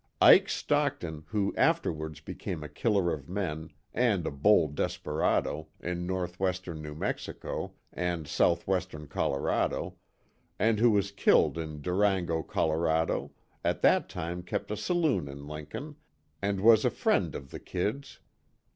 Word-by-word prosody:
Ike -, -, +8 dB
Stockton, 80 Hz, -2 st, -1 dB
who 105 Hz, -3 st, 0 dB
afterwards 80 Hz, -1 st, 0 dB
became 80 Hz, -4 st, -5 dB
a -, -, -5 dB
killer 90 Hz, -, +1 dB
of 70 Hz, -1 st, -7 dB
men, 85 Hz, -5 st, -3 dB, 0.2 s
and 110 Hz, -8 st, +2 dB
a -, -, -1 dB
bold 75 Hz, +1 st, +3 dB
desperado, 75 Hz, +1 st, -1 dB
in 90 Hz, 0 st, -3 dB
northwestern 90 Hz, -2 st, -2 dB
New 75 Hz, -1 st, -7 dB
Mexico, -, -, -4 dB, 0.2 s
and 85 Hz, -3 st, -2 dB
southwestern 90 Hz, -1 st, 0 dB
Colorado, 70 Hz, -1 st, -1 dB, 0.6 s
and 110 Hz, -1 st, +2 dB
who 120 Hz, +1 st, +6 dB
was 100 Hz, -2 st, +2 dB
killed 80 Hz, -7 st, +4 dB
in 75 Hz, -2 st, -6 dB
Durango, 90 Hz, -3 st, +1 dB
Colorado, 80 Hz, +1 st, 0 dB, 0.3 s
at -, -, -1 dB
that -, -, +4 dB
time 85 Hz, +2 st, -4 dB
kept 90 Hz, -, -4 dB
a -, -, 0 dB
saloon 155 Hz, -, +1 dB
in 70 Hz, +1 st, -8 dB
Lincoln, 110 Hz, -, -7 dB, 0.4 s
and 100 Hz, -1 st, 0 dB
was 110 Hz, 0 st, +7 dB
a -, -, +4 dB
friend -, -, +1 dB
of 70 Hz, -1 st, -8 dB
the -, -, -6 dB
"Kid's." 110 Hz, +10 st, -3 dB
90 Hz, 135 wpm, -29 LUFS, 80-100 Hz, 0.6 s, Ike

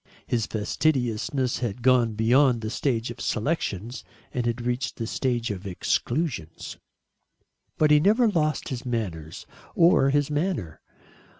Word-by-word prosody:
His 115 Hz, -3 st, -1 dB
fastidiousness 125 Hz, +2 st, -1 dB
had 120 Hz, -1 st, -4 dB
gone 125 Hz, -3 st, +4 dB
beyond 120 Hz, +3 st, +3 dB
the 110 Hz, 0 st, -4 dB
stage 120 Hz, 0 st, -1 dB
of 120 Hz, -, -9 dB
selections, 115 Hz, -, -2 dB, 0.3 s
and 120 Hz, -2 st, -1 dB
had 120 Hz, 0 st, -1 dB
reached 125 Hz, +3 st, -2 dB
the 115 Hz, -, -4 dB
stage 120 Hz, -1 st, -1 dB
of 100 Hz, 0 st, -6 dB
exclusions. 95 Hz, -, -2 dB, 1.0 s
But 155 Hz, -1 st, +3 dB
he 150 Hz, -, +7 dB
never 215 Hz, +9 st, +4 dB
lost 155 Hz, -8 st, 0 dB
his 130 Hz, -2 st, -5 dB
manners, 95 Hz, -, -4 dB, 0.3 s
or 165 Hz, -5 st, +5 dB
his 145 Hz, +1 st, +1 dB
manner. 145 Hz, -, -2 dB
120 Hz, 130 wpm, -25 LUFS, 110-145 Hz, 1.0 s, he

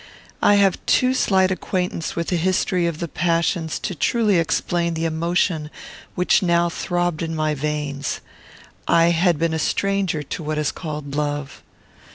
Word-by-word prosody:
I 205 Hz, -, +5 dB
have 200 Hz, -2 st, +2 dB
too 255 Hz, 0 st, +3 dB
slight 190 Hz, -6 st, +2 dB
acquaintance 180 Hz, -3 st, -2 dB
with 170 Hz, 0 st, -2 dB
the 180 Hz, -, +1 dB
history 180 Hz, 0 st, +1 dB
of 170 Hz, -2 st, -3 dB
the 170 Hz, -, -3 dB
passions 165 Hz, 0 st, 0 dB
to 190 Hz, -, -3 dB
truly 210 Hz, +3 st, +2 dB
explain 170 Hz, +1 st, 0 dB
the 165 Hz, +1 st, -1 dB
emotion 165 Hz, -1 st, 0 dB, 0.5 s
which 180 Hz, -, +3 dB
now 170 Hz, -1 st, +2 dB
throbbed 175 Hz, -1 st, -2 dB
in 165 Hz, -1 st, -3 dB
my 155 Hz, -1 st, 0 dB
veins. 145 Hz, -1 st, -3 dB, 0.7 s
I 170 Hz, 0 st, +4 dB
had 170 Hz, 0 st, +2 dB
been 165 Hz, +1 st, 0 dB
a 160 Hz, -, -1 dB
stranger 195 Hz, -3 st, 0 dB
to 150 Hz, -, -6 dB
what 155 Hz, 0 st, -3 dB
is 150 Hz, -2 st, 0 dB
called 150 Hz, -4 st, -6 dB
love. 145 Hz, -1 st, -3 dB
170 Hz, 160 wpm, -22 LUFS, 155-180 Hz, 0.7 s, I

